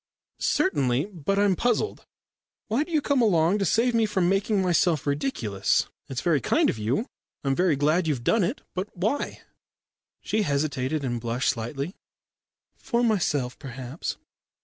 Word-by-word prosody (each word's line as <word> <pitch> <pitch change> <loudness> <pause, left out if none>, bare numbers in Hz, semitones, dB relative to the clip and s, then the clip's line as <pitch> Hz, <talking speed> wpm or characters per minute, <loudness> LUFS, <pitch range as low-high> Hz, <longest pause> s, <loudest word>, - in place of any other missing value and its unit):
"Certainly. 140 - +1
But 185 +4 -1
I'm 200 -2 +3
puzzled. 240 - -1 0.6
Why 235 +7 +2
do 340 - -12
you 310 -2 +2
come 280 -3 +2
along 185 -2 +3
to 195 - +1
save 235 +7 +2
me 225 -1 +3
from 190 -4 +1
making 195 +2 +1
myself 175 -4 +2
ridiculous? 140 - 0 0.2
It's 130 -2 -3
very 160 -6 +2
kind - - +3
of 110 - -8
you. 120 - 0 0.4
I'm 135 -1 +1
very 180 -2 +3
glad 155 +5 +2
you've 135 -6 -1
done 220 - +3
it. 205 +11 -2
But 185 +3 -3
why?" 220 +11 -1 0.8
She 215 - -1
hesitated 140 -3 -1
and 120 -3 -2
blushed 120 +2 0
slightly. 135 +7 -4 0.8
"For 240 -1 -1
myself, 150 - 0
perhaps." 130 +2 -6
170 Hz, 150 wpm, -26 LUFS, 135-210 Hz, 0.8 s, I'm